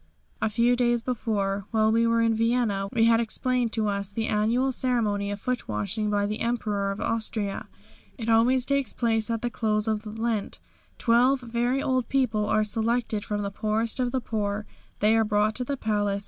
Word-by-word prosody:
A 220 - +1
few 235 +3 +2
days 240 -1 +1
before, 205 -5 -2
while 220 -1 +2
we 230 +1 +3
were 230 0 +2
in 230 0 +3
Vienna, 225 -3 0
we 230 -3 +2
had 230 0 +5
explained 240 +1 0
to 220 -2 0
us 200 -1 -2
the 220 +2 -3
annual 230 +5 +1
ceremony 220 -6 0
of 205 0 -4
foot 250 +3 -3
washing 210 +1 -2
by 205 -1 +1
the 210 +1 -3
Emperor 215 -4 -1
of 195 - -4
Austria. 215 -3 -2 0.5
It 230 -3 -5
always 240 +3 +3
takes 280 -4 0
place 225 -2 0
at 230 0 -2
the 240 - -1
close 215 -1 0
of 215 0 -3
Lent. 225 -2 -2 0.4
Twelve 250 +3 +3
very 240 +3 -1
old 255 -2 0
people 225 -6 +1
are 215 0 +2
selected 220 0 +1
from 205 -1 -3
the 200 - -3
poorest 220 +3 -1
of 250 -1 0
the 260 0 -1
poor. 210 -2 -2 0.4
They 215 +2 +4
are 225 - +4
brought 210 0 +1
to 255 - -1
the 275 +3 -3
palace. 205 -3 0
225 Hz, 190 wpm, -26 LUFS, 210-240 Hz, 0.5 s, had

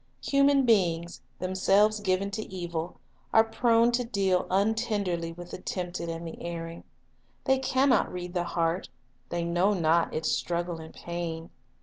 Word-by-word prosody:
Human 275 -1 +4
beings, 170 - +1 0.2
themselves 195 +3 +2
given 195 0 0
to 215 - -3
evil, 175 -2 -4 0.4
are 220 - +8
prone 230 +1 +3
to 245 +1 +1
deal 195 -6 +1
un 200 +4 +3
tenderly 200 -7 -2
with 175 +1 -10
the - - -6
tempted 180 -2 -4
and 165 +1 -5
the 165 - -9
erring. 165 -1 -6 0.6
They 265 -1 +3
can 265 +1 +2
not 250 - +3
read 180 -1 -6
the 175 -2 0
heart, 170 +1 -1 0.4
they 175 0 -2
know 175 +4 +2
not 165 -1 +2
its 155 - -1
struggle 175 -1 -2
and 160 0 -9
pain. 170 -1 -5
180 Hz, 155 wpm, -28 LUFS, 170-215 Hz, 0.6 s, are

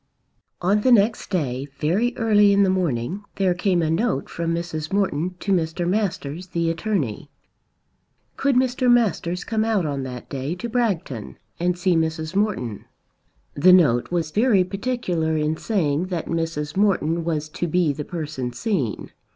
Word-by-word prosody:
On 200 +4 +3
the 255 - +3
next 220 -1 +3
day, 140 -7 -2
very 205 +11 0
early 210 -3 +4
in 200 0 +4
the 190 - +3
morning, 175 - -1
there 190 -2 +2
came 175 -1 +1
a 155 - 0
note 180 - 0
from 165 0 -2
Mrs. 160 -3 -4
Morton 185 -3 0
to 200 - -2
Mr. 170 -1 0
Masters, 180 -4 -2
the 170 -2 0
attorney. 165 - -2 1.1
Could 275 -1 +1
Mr. 255 0 +2
Masters 185 -6 +1
come 220 -1 0
out 220 -6 +1
on 140 -2 -2
that 125 -2 -7
day 140 +4 -3
to 210 +6 -5
Bragton 190 - -2 0.2
and 180 +1 0
see 180 0 +2
Mrs. 160 +1 -1
Morton. 190 - -1 0.7
The 180 +6 +6
note 140 -10 +4
was 170 -3 -1
very 210 -1 +3
particular 185 -6 -1
in 155 +1 0
saying 165 -4 0
that 175 -3 -3
Mrs. 165 -3 -3
Morton 175 -5 +1
was 155 -2 -2
to 175 +2 -3
be 170 -2 +2
the 150 - -5
person 150 -7 -4
seen. 140 - -2
175 Hz, 160 wpm, -23 LUFS, 155-200 Hz, 1.1 s, The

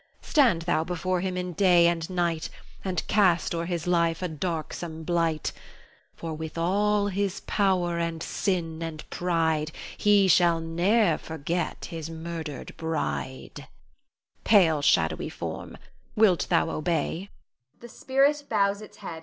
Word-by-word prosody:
Stand 235 - +3
thou 170 -2 +1
before 180 +1 -1
him 185 -1 -2
in 180 -1 -3
day 175 -1 +5
and 170 0 +1
night, 170 -3 -1 0.3
And 185 -3 -2
cast 185 -6 +3
o'er 170 0 -2
his 170 -3 -3
life 170 -1 +1
a - - 0
darksome 160 0 -4
blight; 165 -2 0 0.6
For 165 -1 -5
with 160 +1 -6
all 205 +4 +2
his 200 0 -2
power 180 -4 +1
and 165 -1 -2
sin 165 -5 -2
and 160 -2 -6
pride, 160 -3 0 0.2
He 205 -2 +4
shall 170 -2 +4
ne'er 170 +3 +2
forget 160 +2 -3
his 165 -1 -5
murdered 160 -2 -6
bride. 160 -4 -4 0.8
Pale, 165 -8 +5
shadowy 80 - +2
form, - - -6 0.4
wilt 210 -5 +4
thou 165 - +2
obey? 165 +4 -2
170 Hz, 120 wpm, -26 LUFS, 160-185 Hz, 0.8 s, day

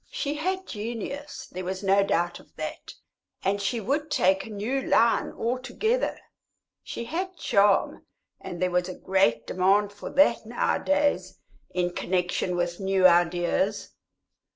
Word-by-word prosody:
She 285 - -2
had 375 +5 -2
genius, 240 +7 -6
there 185 +1 -5
was 190 +2 -4
no 195 +1 +4
doubt 175 -2 0
of - - -21
that, - - -6 0.5
and 200 +1 0
she 230 +4 -1
would 285 +8 -1
take 190 -8 +2
a - - -10
new 220 +6 -2
line 230 -2 +3
altogether. 255 - -1 0.6
She - - -6
had 360 +9 -4
charm, 200 -7 +2 0.3
and 175 - -7
there 180 0 +1
was 180 +1 0
a 185 - -6
great 190 -12 +1
demand 200 +3 +2
for 205 - -8
that 280 -4 +4
nowadays 285 +5 0 0.3
in 180 -1 -1
connexion 180 0 -1
with 175 0 -2
new 190 -1 +2
ideas. 175 +3 +2
200 Hz, 140 wpm, -26 LUFS, 185-265 Hz, 0.6 s, no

